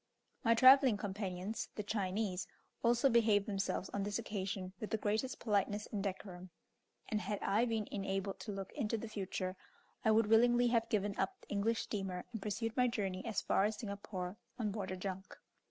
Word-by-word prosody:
My 230 -1 +5
travelling 260 -1 +8
companions, 200 0 -3
the 210 - -3
Chinese, 195 -2 -1 0.4
also 240 +3 +4
behaved 220 -5 +4
themselves 195 -2 -1
on 200 - -1
this 205 +1 -1
occasion 195 -4 -4
with 215 - -4
the 220 - 0
greatest 215 +5 -1
politeness 205 -1 0
and 205 - -2
decorum; 185 -2 -5 0.6
and, 215 -1 0
had 205 +3 -2
I 215 +5 +3
been 225 -3 -1
enabled 195 -1 -2
to 215 - -5
look 195 -1 -5
into 225 +1 -1
the 230 - -5
future, 190 -3 -3 0.5
I - - +3
would 220 0 +5
willingly 240 +2 +5
have 230 -1 +2
given 205 -3 0
up 385 - -1
the - - -20
English 215 +3 +1
steamer 190 -3 -3
and 220 - -4
pursued 220 +2 -2
my 250 -1 +4
journey 195 -6 -2
as 225 -2 -1
far 195 - +3
as 215 0 -1
Singapore 200 -3 -5 0.2
on 215 -4 -1
board 195 -2 -4
a 185 - -3
junk. 190 +1 -5
205 Hz, 185 wpm, -36 LUFS, 195-225 Hz, 0.6 s, travelling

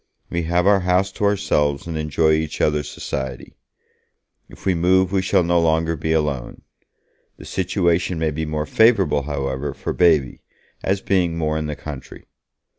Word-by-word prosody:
We 85 - -1
have 90 +1 +2
our 100 0 +5
house 90 +1 +1
to 105 - -2
ourselves 75 -8 +1
and 85 -1 -5
enjoy 80 +1 +1
each 80 -1 -1
other's 75 -1 0
society. 65 -3 -5 1.0
If - - -15
we 95 - +3
move 90 +2 +2
we 95 -1 +1
shall 95 -1 +2
no 85 0 +2
longer 80 0 +1
be 80 +1 -3
alone. 75 -6 -2 0.7
The - - -12
situation 90 -2 0
may 80 -1 0
be 80 +1 -3
more 75 0 -2
favourable, 95 -9 +3
however, 70 -1 -3
for - - -4
Baby, 80 -8 +2 0.4
as 95 +1 -1
being 90 -4 0
more 80 -1 -1
in 80 -1 -2
the 75 - -4
country. 70 -4 -9
80 Hz, 165 wpm, -21 LUFS, 75-90 Hz, 1.0 s, our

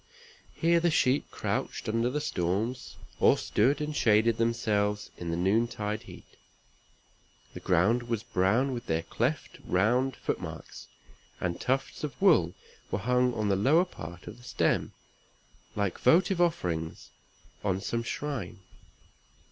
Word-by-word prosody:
Here 170 0 +3
the 170 +1 +2
sheep 140 -3 +2
crouched - - -3
under 115 +2 +1
the 145 +4 -1
storms, 105 - -2 0.2
or - - +5
stood 130 +7 +1
and 150 0 -3
shaded 110 -1 +3
themselves 105 -3 0
in 85 - -6
the 85 - -1
noontide 105 +2 0
heat. - - -12 1.3
The - - -7
ground 110 +8 +2
was 115 -2 -1
brown 115 +5 +1
with 120 0 -6
their 80 0 0
cleft 130 - -2
round 120 +8 +1
foot - - -3
marks; - - -9 0.5
and 85 -1 -3
tufts 135 +2 -1
of 150 -2 -5
wool 150 - +4 0.3
were - - -1
hung 125 +3 +1
on 105 -1 0
the 100 - +3
lower 145 - +4
part 85 - -10
of 110 - -9
the 120 - -17
stem, - - 0 0.8
like 100 -4 -1
votive 180 +1 +4
offerings 85 - -1 0.5
on 95 -2 0
some 115 +4 -2
shrine. 135 -1 -4
115 Hz, 140 wpm, -29 LUFS, 100-135 Hz, 1.3 s, or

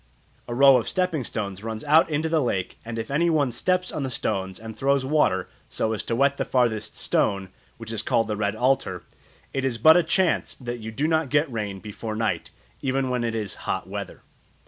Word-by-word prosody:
A 120 - -4
row 135 0 +7
of 120 - -2
stepping 180 -7 0
stones 100 -3 -4
runs 110 -1 -4
out 155 +3 +5
into 155 +1 0
the 160 -1 +2
lake, 95 -8 -2
and 115 0 -6
if 115 +3 -4
any 165 +5 +2
one 145 -5 +2
steps 180 +9 0
on - - -3
the 135 - -2
stones 95 -6 -2
and 110 0 -8
throws 140 0 +1
water 130 -11 +2 0.2
so 110 - -1
as 110 - -2
to 115 - -2
wet 140 +3 +2
the - - 0
farthest 115 -4 0
stone, 95 -2 0 0.3
which 115 -1 -8
is 110 -2 -2
called 115 0 +1
the 105 - -1
Red 105 0 -1
Altar, 115 - 0 0.5
"it 135 - -1
is 130 -3 0
but 160 +8 +7
a - - +5
chance 175 +2 +1
that 120 -2 -6
you 110 0 -6
do 140 +7 0
not 160 -3 +1
get 145 0 +2
rain 105 -3 -3
before 110 +2 -6
night, 110 0 -1 0.3
even 130 -1 0
when 125 -1 0
it 115 -1 -1
is 105 -4 -2 0.2
hot - - -1
weather." - - -7
120 Hz, 215 wpm, -25 LUFS, 110-145 Hz, 0.5 s, row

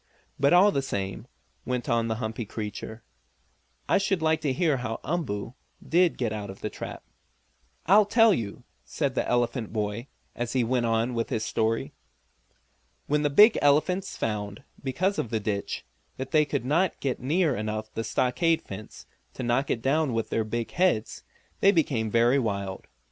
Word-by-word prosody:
"But, 140 +1 +4
all 185 +4 +6
the 140 - 0
same," 100 -4 -4 0.4
went 125 -2 -3
on 115 -1 +1
the 110 - -1
humpy 110 0 -4
creature, 110 +1 -6 0.8
"I - - +3
should 195 -2 0
like 160 0 +1
to 145 -3 0
hear 155 -1 +1
how 115 -2 -4
Umboo 125 -10 -3 0.3
did 175 +1 +3
get 115 -4 -1
out 105 -2 -5
of 95 - -10
the - - -3
trap." - - -7 0.8
"I'll 200 +4 +6
tell 225 0 +5
you," 110 - -4 0.2
said - - -2
the - - -1
elephant 120 -1 0
boy, 105 +3 -3 0.3
and 120 -1 -3
he 125 0 +1
went 120 0 +1
on 115 +2 +1
with 115 -1 -2
his 110 0 -1
story. 115 0 -1 1.1
When 150 +1 +1
the 145 - +2
big 210 +10 +7
elephants 180 +7 +2
found, 105 0 -3 0.2
because 185 +9 0
of 115 - -2
the 110 - 0
ditch, 100 -1 -3 0.3
that 130 0 -5
they 155 -2 +4
could 140 -4 -2
not 165 +7 +1
get 135 -3 -2
near 150 +2 +1
enough 110 0 -4
the 115 - -3
stockade 130 +9 +1
fence 100 +2 -9 0.3
to - - -5
knock 125 +3 +1
it 115 - -1
down 145 0 +2
with 115 -1 -2
their 110 - +1
big 115 +2 -3
heads, 175 -12 +1 0.4
they 195 - +6
became 135 - +1
very 120 +5 +4
wild. 100 -5 -3
125 Hz, 175 wpm, -27 LUFS, 110-155 Hz, 1.1 s, big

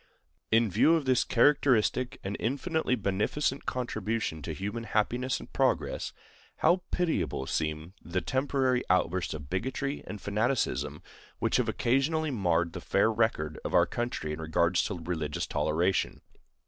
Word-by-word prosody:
In 115 -2 +3
view 160 - +5
of 160 -4 -1
this 130 -2 +3
characteristic 130 -2 +3
and 100 +2 -3
infinitely 140 +3 0
beneficent 110 +7 -1
contribution 110 -8 -2
to - - -5
human 105 +4 -4
happiness 120 +4 0
and - - -12
progress, - - 0 0.5
how 180 +1 +3
pitiable 105 - -1
seem 80 +4 -2
the 85 +3 -2
temporary 130 +2 +1
outbursts 90 -1 +1
of 75 -3 -8
bigotry 130 +8 -2
and 105 - -6
fanaticism 100 - -1 0.3
which - - +1
have - - +1
occasionally 145 +5 +1
marred 85 -7 +1
the - - -6
fair 105 +3 +2
record 105 -9 0
of - - -2
our 85 -1 +6
country 120 -9 -3
in 80 - -6
regard 80 +2 +1
to 95 +2 +1
religious 80 -3 -3
toleration! 80 +5 0
105 Hz, 140 wpm, -29 LUFS, 85-130 Hz, 0.5 s, our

